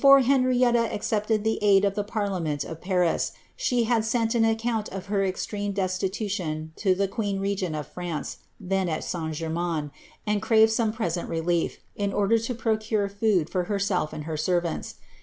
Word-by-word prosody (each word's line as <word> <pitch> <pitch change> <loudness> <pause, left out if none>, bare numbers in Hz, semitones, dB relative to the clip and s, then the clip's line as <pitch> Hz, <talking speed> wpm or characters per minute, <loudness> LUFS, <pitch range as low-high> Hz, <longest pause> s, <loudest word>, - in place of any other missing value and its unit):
enrieita 255 -3 +5
accepted 210 0 0
the 220 0 0
aid 200 -1 +5
of 200 - +1
the 205 0 -1
parliament 190 -9 -2
of 160 0 -8
Paris, 180 -2 +1 0.2
she 245 -2 +1
had 230 -1 +2
>unt 225 -1 +1
of 190 -1 -6
her 200 0 0
extreme 205 +2 -2
destitution 185 -4 -2
to 190 -3 +2
the 200 +1 +1
queen 200 -1 -2
regent 195 -4 -1
of 150 -1 -3
France, 175 -3 -5 0.2
}ermains, 165 -3 -2 0.3
and 210 -1 +1
craved 220 +1 +5
some 220 -1 +1
present 180 -6 -2
relief, 165 +1 0 0.2
in 200 -1 -1
order 205 +3 +3
to 230 +2 -3
procure 220 -2 0
■self 195 -3 0
and 150 - -6
her 155 0 -4
servants. 175 +1 -1
200 Hz, 140 wpm, -26 LUFS, 175-220 Hz, 0.3 s, enrieita